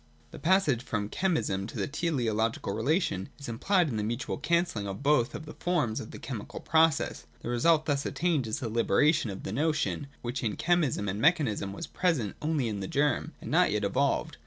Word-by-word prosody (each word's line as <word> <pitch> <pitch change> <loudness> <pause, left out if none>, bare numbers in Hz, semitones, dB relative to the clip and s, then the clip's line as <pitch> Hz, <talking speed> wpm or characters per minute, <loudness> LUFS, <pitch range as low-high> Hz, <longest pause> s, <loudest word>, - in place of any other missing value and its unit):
The - - -9
passage 165 -9 +3
from 105 -4 -3
chemism 155 - 0
to - - -8
the - - 0
teleological 125 - -1
relation 110 - 0
is 140 - -9
implied 175 - +2
in 120 -7 -2
the 105 - -1
mutual 120 +6 -3
cancelling 170 - 0
of 100 +7 -6
both 135 -5 +3
of 155 - -6
the 155 - -9
forms 155 -11 0
of 110 - -7
the - - -9
chemical 115 -7 -6
process. 160 -2 +2
The - - -5
result 155 +6 +3
thus 140 -2 0
attained 160 -8 0
is 110 - -1
the 130 -5 -3
liberation 145 +5 +3
of 95 - -6
the 95 - -4
notion, 150 +1 0 0.2
which 120 +2 -3
in 110 -3 -1
chemism 155 - +1
and 100 +2 -2
mechanism 135 - +2
was 100 - -5
present 150 - 0
only 150 -5 0
in 105 -2 -3
the 95 - -4
germ, 145 +2 0
and - - -6
not - - +4
yet - - 0
evolved. - - 0
135 Hz, 200 wpm, -29 LUFS, 110-160 Hz, 0.2 s, not